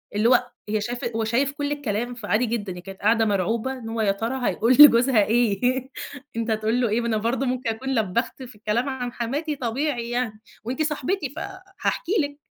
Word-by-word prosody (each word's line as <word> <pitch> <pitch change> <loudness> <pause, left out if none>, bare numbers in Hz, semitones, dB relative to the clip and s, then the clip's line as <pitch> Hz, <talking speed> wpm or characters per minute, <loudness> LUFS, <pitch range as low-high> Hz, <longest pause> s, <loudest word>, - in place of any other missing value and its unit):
اللي 220 +3 +3
هو 250 -1 +3 0.2
هي 215 0 0
شايفة 240 +1 -3
هو 225 - 0
شايف 255 +6 +1
كل 285 0 -3
الكلام، 240 -4 -2
فعادي 225 +1 0
جدًا. 215 -5 -3
هي 180 - -8
كانت 195 +1 -10
قاعدة 225 +2 +3
مرعوبة 220 +5 0
إن 235 -4 -7
هو 225 0 -2
يا 200 -2 +3
ترى 235 +5 -2
هيقول 235 +3 +2
لجوزها 245 -5 +8
إيه؟ 225 -2 +2 0.7
أنت 230 0 -1
هتقول 220 +3 +1
له 235 - +2
إيه؟ 230 +3 +1
ما 235 - -2
أنا 220 -2 +1
برضه 240 +5 0
ممكن 255 -2 -1
أكون 260 +4 -2
لبّخت 225 +5 -1
في 240 -3 -11
الكلام 220 +6 -1
عن 250 -2 -4
حماتي 290 +6 -2
طبيعي 245 -1 -2
يعني، 240 -3 -2 0.2
وأنتِ 255 +7 -3
صاحبتي 300 +1 -1
فهاحكي 375 +3 -4
لِك. 285 0 -4
240 Hz, 195 wpm, -24 LUFS, 220-265 Hz, 0.7 s, لجوزها